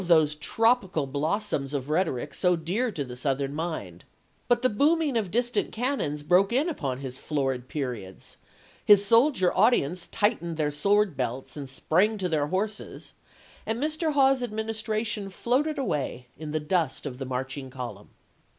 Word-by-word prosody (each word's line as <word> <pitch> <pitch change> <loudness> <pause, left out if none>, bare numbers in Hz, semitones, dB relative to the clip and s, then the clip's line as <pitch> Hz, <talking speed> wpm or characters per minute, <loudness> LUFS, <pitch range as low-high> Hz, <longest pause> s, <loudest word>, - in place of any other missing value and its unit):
those 160 -3 +5
tropical 195 - +1
blossoms 145 0 -2
of 135 -1 -3
rhetoric 150 -4 -1
so 180 -1 +2
dear 190 +10 -1
to 155 -8 -3
the 125 -2 -8
Southern 135 +2 -1
mind; 150 - -4 0.4
but 240 0 +2
the - - +6
booming 295 +5 +2
of 215 -5 0
distant 240 +5 0
can 255 +5 0
non 145 - -1
broke 180 +7 +3
in 270 +7 +2
upon 135 - -3
his 130 -1 -6
florid 135 -4 -2
periods; 120 -11 -5 0.5
his 205 -1 +6
soldier 230 -3 +4
audience 185 - +2
tightened 205 -7 0
their 150 -2 0
sword 200 +4 +2
belts 130 0 -3
and 140 -3 -6
sprang 190 +10 +1
to 190 -2 -1
theii" 150 -3 0
horses, 210 +4 -4 0.5
and 225 - -2
Mr. 310 +2 0
Hawes's 270 -2 +4
administration 220 -2 -2
floated 260 - 0
away 145 - -2
in 155 +1 -7
the 155 +1 -1
dust 155 -2 -1
of 130 -3 -5
the 135 - -3
marching 130 +1 -4
column. 120 -6 -7
175 Hz, 160 wpm, -27 LUFS, 140-225 Hz, 0.5 s, the